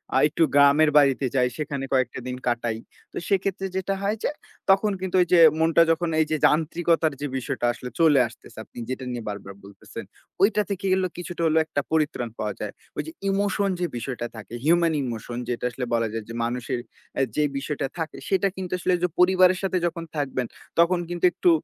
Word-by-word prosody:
আ - - +5
একটু 165 +2 +1
গ্রামের 145 +2 +6
বাড়িতে 140 -2 +4
যাই, 125 -1 +3
সেখানে 140 -3 -3
কয়েকটা 130 -1 +1
দিন 125 0 -4
কাটাই। 120 -2 0 0.3
তো - - -8
সেক্ষেত্রে 195 0 0
যেটা 190 +1 -1
হয় 205 +2 0
যে, - - +1 0.4
তখন 200 +2 +4
কিন্তু 190 0 -3
ওইযে 175 0 +4 0.2
মনটা 165 +1 +4
যখন 165 +1 0
এইযে 155 0 0
যান্ত্রিকতার 160 0 +2
যে 145 - -1
বিষয়টা 120 -1 -3
আসলে 125 - -8
চলে 155 -4 +5
আসতেছে 115 - -16
আপনি - - -20
যেটা 130 0 -4
নিয়ে 120 -2 -4
বারবার 100 -1 -7
বলতেছেন। 100 -1 -10 0.4
ঐটা 210 +1 +4
থেকে 200 0 -3
গেলো 190 0 +1
কিছু 175 -1 -6 0.2
হলো 160 0 +2
একটা 145 - -2
পরিত্রাণ 150 -7 0
পাওয়া 105 -1 -2
যায়। 105 -1 -5 0.2
ওইযে 320 - -3 0.2
ইমোশন 200 0 +1
যে 180 - +1
বিষয়টা 120 0 -4
থাকে, 110 0 -10
হিউমেন 170 0 +4
ইমোশন 120 -1 -5
যেটা 120 0 -2
আসলে 125 +1 -4
বলা 115 -1 +2
যায় 115 -1 -3
যে - - -6
মানুষের 125 +1 -2 0.4
এ - - +3
যে 150 - +2
বিষয়টা 145 0 -2
থাকে। 160 -2 -4
সেটা 195 0 +2
কিন্তু 185 -2 -6
আসলে 180 +1 0
ঐযে 180 0 0
পরিবারের 185 0 +5
সাথে 190 -1 0
যখন 170 0 -2
থাকবেন, 135 -3 -1 0.3
তখন 175 +1 +4
কিন্তু 175 0 0
একটু 180 - +2
155 Hz, 190 wpm, -24 LUFS, 125-180 Hz, 0.4 s, গ্রামের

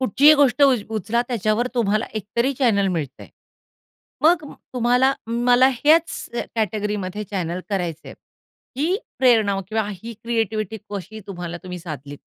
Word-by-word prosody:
कुठचीही 275 +5 +6
गोष्ट 285 0 +3
उ 275 -2 +7 0.2
उचला 230 +4 0
त्याच्यावर 225 +1 0
तुम्हाला 215 -2 +1
एक 215 - -3
तरी 260 +4 +2
चॅनेल 205 -7 +3
मिळतंय. 155 -8 -4 1.0
मग 325 0 +4
अ, - - -11 0.2
तुम्हाला 250 +2 +3
मला 245 +3 +4
ह्याचं 305 -3 +1 0.2
कॅटेगरीमध्ये 210 -1 -2
चॅनेल 180 -2 -3
करायचंय, 175 -5 -3 0.6
ही 325 +8 +1 0.2
प्रेरणा 220 -6 +3
किंवा 220 -1 -1
ही 225 +5 -8
क्रिएटीव्हीटी 220 -2 -1
कशी 205 +2 -6
तुम्हाला 175 -2 -5
तुम्ही 180 -1 -6
साधलीत? 145 -4 -8
220 Hz, 130 wpm, -22 LUFS, 195-245 Hz, 1.0 s, उ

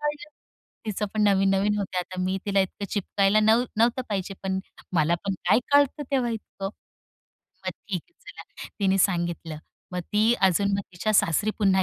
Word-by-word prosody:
कळलं. 295 0 -3 0.6
तिचं 210 0 -1
पण 215 - +1
नवीन-नवीन 195 +1 +3
होतं. 190 -2 -2
आता 185 +1 -4
मी 185 +1 0
तिला 200 -1 +3
इतकं 190 +2 -3
चिपकायला 200 +1 +2
नव्ह 220 +3 +4
नव्हतं 235 +3 +2
पाहिजे 195 -2 -3
पण. 190 0 -1 0.3
मला 165 0 +3
पण 195 - -1
काय 210 - +6
कळतं 285 +1 +4
तेव्हा 255 -3 +1
इतकं. 210 -3 -5 1.0
मग - - +1 0.2
ठीक 180 -4 -2
आहे - - -39 0.2
चला. - - -11
तिने 195 0 +3
सांगितलं. 170 -4 0 0.4
मग 180 - -2
ती 215 +3 +4
अजून 195 +1 +3
मग 200 - -1
तिच्या 185 +5 -1
सासरी 200 +3 +3
पुन्हा 190 -2 +3
200 Hz, 170 wpm, -26 LUFS, 190-215 Hz, 1.0 s, काय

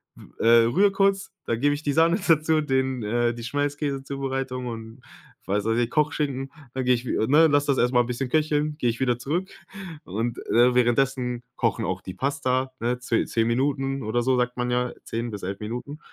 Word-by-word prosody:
w - - -14 0.2
äh, 115 0 +6
rühre 195 - +3
kurz, 195 0 +1
dann 115 0 -1
gebe 145 +2 +3
ich 145 - -4
die 145 -2 0
Sahne 165 +5 +3
dazu, 160 -1 +3
den, 130 -3 0
äh 120 +2 +1
die 120 0 -8
Schmelzkäse-Zubereitung 135 -2 -3
und 115 +1 -8 0.5
was 100 +1 +1
weiß 115 +1 +1
ich, 120 -1 +1
Kochschinken, 145 -3 -1 0.2
dann 130 - -2
gehe 125 0 +4
ich 120 +1 -2
wie - - -1
ne? 155 +4 +6
Lasse 145 -1 +2
das 140 - +2
erst 125 +1 +2
mal 120 - +5
'n - - -1
bisschen 125 +2 -2
köcheln, 150 0 +1
gehe 120 - +2
ich 115 +2 -3
wieder 125 -2 +1
zurück 170 +9 -2 0.5
und, 115 +5 -3
äh, 125 +1 +4
währenddessen 125 0 +1
kochen 115 -4 0
auch 95 -1 -3
die 95 - -7
Pasta, 130 +2 -1
ne? 125 +1 -1
Ze 120 -2 0
10 115 -1 0
Minuten 135 +2 0
oder 110 +3 0
so 130 0 +2
sagt 125 0 -1
man 125 0 -1
ja, 125 0 0
10 115 0 -3
bis 100 -2 -7
11 95 +2 -4
Minuten. 125 +8 -6
125 Hz, 205 wpm, -25 LUFS, 120-145 Hz, 0.5 s, äh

